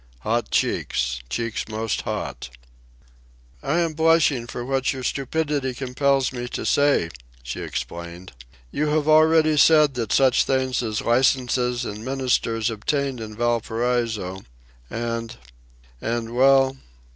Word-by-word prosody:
"Hot - - -1
cheeks—cheeks 60 - -1
most 110 0 -2
hot." 65 - -5 1.1
"I 165 +5 0
am 165 -2 -1
blushing 155 -6 +3
for 120 0 -6
what 135 0 0
your 130 -2 -6
stupidity 140 -1 -1
compels 135 +1 0
me 120 -1 -4
to - - -5
say," 145 - +2 0.3
she - - -5
explained. 85 +2 -6 0.4
"You 150 +1 -1
have 150 0 0
already 155 0 +5
said 150 -1 +5
that 115 -4 -3
such 130 -2 +4
things 130 -1 0
as 110 -3 -2
licences 125 0 +1
and 105 +1 -6
ministers 125 -3 0
obtain 135 +4 -2
in 110 -1 -7
Valparaiso... 115 -4 -1 0.5
and... 115 -1 -4 0.6
and, 115 0 -3
well 135 +1 +4
125 Hz, 120 wpm, -23 LUFS, 115-140 Hz, 1.1 s, already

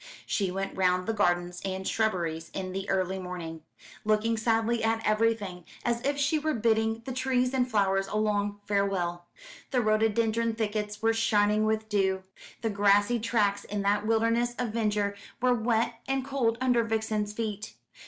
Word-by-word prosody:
She 195 -3 0
went 195 +1 -3
round 185 -1 +2
the 225 - -1
gardens 175 -3 0
and 190 0 -3
shrubberies 170 -7 -1
in 185 -1 -3
the 195 +1 -4
early 190 0 0
morning, 175 -3 -6 0.4
looking 215 +2 +2
sadly 225 +1 +1
at 225 0 0
everything, 215 -4 0 0.2
as 235 0 0
if 280 +2 0
she 285 +2 +2
were 310 -1 -1
bidding 225 0 +1
the 265 - -4
trees 255 0 +1
and 255 -1 +1
flowers 195 -3 +2
a 200 - -5
long 205 -1 0
farewell. 185 -4 -1 0.4
The 255 - +1
rhododendron 225 +1 +1
thickets 210 -1 -3
were 225 0 +4
shining 215 -1 +2
with 220 0 0
dew, 190 -2 +1 0.4
the 225 - +1
grassy 205 +3 +3
tracks 210 -3 +1
in 205 -1 -3
that 205 +1 +1
wilderness 230 +2 +2
of 245 -2 -1
verdure 210 -2 0 0.3
were 250 +1 +3
wet 230 0 0
and 270 -1 -1
cold 255 -5 0
under 250 -2 +3
Vixen's 220 -2 -1
feet. 210 -1 -4
215 Hz, 165 wpm, -28 LUFS, 200-230 Hz, 0.4 s, were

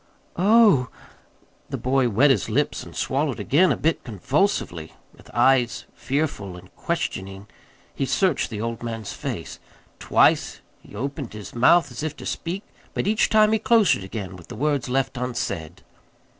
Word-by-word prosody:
"Oh 200 - +5
h!" - - -19 0.8
The - - -3
boy 130 -1 +1
wet 130 +7 +4
his 115 -3 0
lips 140 +7 0
and - - -11
swallowed 140 0 -1
again 175 +6 +3
a - - 0
bit 160 +1 0
convulsively. 110 - -1 0.2
With - - -18
eyes 125 0 +2
fearful 130 - -3
and 90 - -16
questioning 95 +1 -4 0.5
he 135 - -2
searched 185 -2 +1
the 105 -2 -5
old 115 0 -4
man's 115 -3 -5
face. - - -6 0.4
Twice - - +2 0.2
he - - -15
opened 140 +2 -5
his 105 -1 -9
mouth 145 +5 +4
as 120 - -6
if 155 -1 -3
to - - -9
speak; 180 +5 -4 0.3
but - - -1
each 215 +2 +2
time 215 -1 +5
he 220 - +2
closed 225 -3 +4
it - - -7
again 95 -1 -6
with 90 -2 -14
the 120 - -8
words 140 +1 -1
left 135 0 -1
unsaid. 100 -10 -4
130 Hz, 165 wpm, -23 LUFS, 110-155 Hz, 0.8 s, Oh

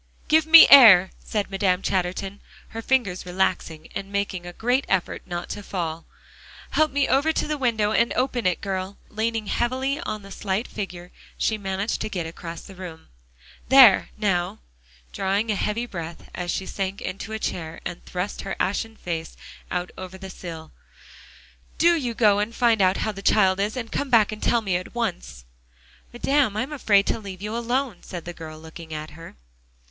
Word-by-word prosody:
"Give 315 0 +4
me 325 +1 +10
air," 200 -9 +9
said 205 -2 -2
Madame 190 -1 +1
Chatterton, 190 +1 -2 0.3
her 225 - -6
fingers 225 -8 0
relaxing, 180 -3 -2
and 195 0 -6
making 195 -3 -2
a 175 - -8
great 245 +7 +1
effort 190 -2 0
not 175 0 -4
to - - -5
fall. 170 -4 -4 0.6
"Help 310 0 +3
me 280 0 +1
over 280 +5 +3
to - - -1
the 305 - -1
window, 225 -6 +1
and 235 +2 +2
open 250 -5 0
it, 180 - 0
girl" 190 0 -4
and 215 - -22
leaning 225 -1 0
heavily 260 +6 -1
on 215 - -5
the 195 - -12
slight 195 +3 -2
figure, 180 -4 -7 0.3
she 220 - +1
managed 195 +1 -3
to - - -3
get 180 -5 -3
across 165 0 -8
the 195 - -12
room. 180 -4 -10 0.6
"There 260 -7 +7
now," 180 -5 0 0.6
drawing 200 - 0
a - - 0
heavy 210 +4 -1
breath 170 -6 -8
as 175 0 -5
she 190 - -2
sank 195 0 -4
into 195 +3 -6
a 220 - -2
chair 165 -6 -4
and 175 - -6
thrust 180 +2 -4
her 195 - -4
ashen 220 +3 -1
face 165 -5 -5 0.3
out 180 0 -3
over 185 0 -8
the 190 0 -9
sill, 165 -3 -9 1.1
"do 345 +1 +5
you 250 -7 -2
go 210 -3 +4
and 220 +3 -2
find 230 -4 +3
out 185 0 +3
how 215 - 0
the 195 -1 -9
child 195 -2 +3
is. 210 +4 -1
And 230 -2 -5
come 285 - -2
back 225 -4 +4
and 215 - -7
tell 235 - +2
me 190 -5 0
at 185 +6 -9
once." 175 - -4 0.7
"Madame, 250 -3 +1
I'm 255 +6 -2
afraid 205 -8 +3
to - - -1
leave 195 -2 -9
you 210 +2 -4
alone," 240 -1 -1
said 175 -2 -8
the 175 - -6
girl, 160 -2 -9
looking 160 0 -9
at 155 0 -6
her. 165 +2 -12
200 Hz, 185 wpm, -24 LUFS, 180-230 Hz, 1.1 s, me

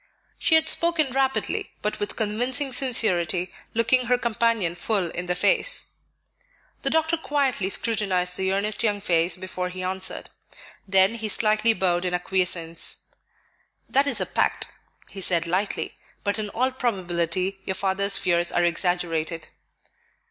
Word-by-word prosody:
She 320 - +3
had 320 0 +3
spoken 330 -4 +2
rapidly, 270 +1 -1
but 210 - -2
with 205 - -3
convincing 245 +5 0
sincerity, 185 -9 +1 0.2
looking 245 +2 +2
her 250 +1 +3
companion 230 -6 0
full 185 -2 -1
in 180 0 -3
the 180 - 0
face. - - +1 0.9
The - - +1
doctor 320 +1 +1
quietly 275 -10 0
scrutinized 195 -5 +1
the 190 0 0
earnest 200 +2 0
young 210 -3 +1
face 170 -3 +2
before 180 0 -4
he 185 0 -6
answered. 190 0 -1 0.6
Then 190 +2 +4
he 225 -2 -4
slightly 215 +2 +4
bowed 180 -3 0
in 180 0 0
acquiescence. 180 -2 0 0.8
"That 275 +1 +2
is 280 - +2
a - - -1
pact," - - -1 0.4
he 195 - -6
said 170 -2 +1
lightly; 185 +4 -2 0.3
"but 205 +2 0
in 210 -1 -2
all 255 +5 0
probability 185 -5 -2
your 190 - -1
father's 200 +1 +1
fears 175 -1 +2
are 175 - +2
exaggerated." 170 -2 -1
195 Hz, 140 wpm, -24 LUFS, 180-235 Hz, 0.9 s, Then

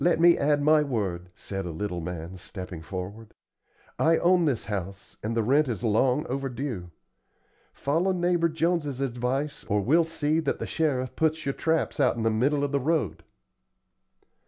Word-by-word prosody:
"Let 175 -1 +3
me 170 0 +7
add 145 0 +2
my 155 +1 +5
word," 100 -11 -2
said 95 -1 -5
a - - -4
little 90 +1 -3
man, 85 +1 -6
stepping 90 -2 -8
forward. 95 +6 -7 0.6
"I 165 +1 +4
own 175 -1 +4
this 135 -7 0
house, 100 -1 -6
and 115 +2 -2
the 115 - +2
rent 140 +6 +3
is 120 -1 -3
long 125 +6 +2
overdue. 130 - -4 0.8
Follow 165 +7 0
neighbor 175 -2 +2
Jones's 160 -4 0
advice 135 +2 -2
or 105 - +1
we'll 155 - +4
see 160 -1 0
that 155 -4 -1
the - - -4
sheriff 135 -6 -1
puts 160 0 0
your 140 - 0
traps 160 +1 0
out 130 -4 +3
in 115 - -3
the 115 - +2
middle 140 +6 +1
of 145 - -1
the 140 - +1
road." 145 - 0
135 Hz, 170 wpm, -27 LUFS, 105-155 Hz, 0.8 s, me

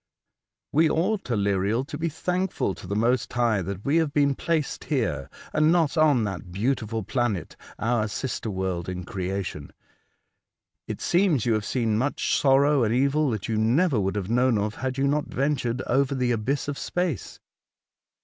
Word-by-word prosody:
" - - -64
We 160 +2 +4
ought, 190 +5 0
Aleriel, 100 +2 +1
to 145 - -7
be 165 +3 -1
thankful 180 - -1
to 95 - -11
the 100 - -2
Most 120 +4 +1
High 115 -4 +1
that 100 +2 -6
we 145 +4 +3
have 160 -3 +1
been 140 -1 +4
placed 160 +1 -2
here, 105 - -1 0.2
and 155 +1 +4
not 165 -6 +2
on 150 -7 +4
that 95 -4 -5
beautiful 110 +1 -1
planet, 120 -4 -2 0.2
our 115 -1 0
sister 115 +2 -3
world 95 -3 -2
in 90 0 -4
creation. 95 -5 -4 1.2
It - - -5
seems 170 - +2
you 120 - +2
have 110 -2 -1
seen 110 -2 0
much 140 +4 0
sorrow 140 0 +4
and 110 - +1
evil 140 +3 +2
that 110 -5 -3
you 110 -2 -1
never 130 +5 +3
would 95 0 -1
have 100 -3 -2
known 125 -1 +3
of 105 +1 -1
had 130 +2 -4
you 135 +1 +2
not 145 +1 0
ventured 130 -3 -1
over 140 +2 +1
the 125 -2 +1
abyss 125 +6 -1
of 145 -1 -3
space." 175 - -3
125 Hz, 175 wpm, -25 LUFS, 105-145 Hz, 1.2 s, We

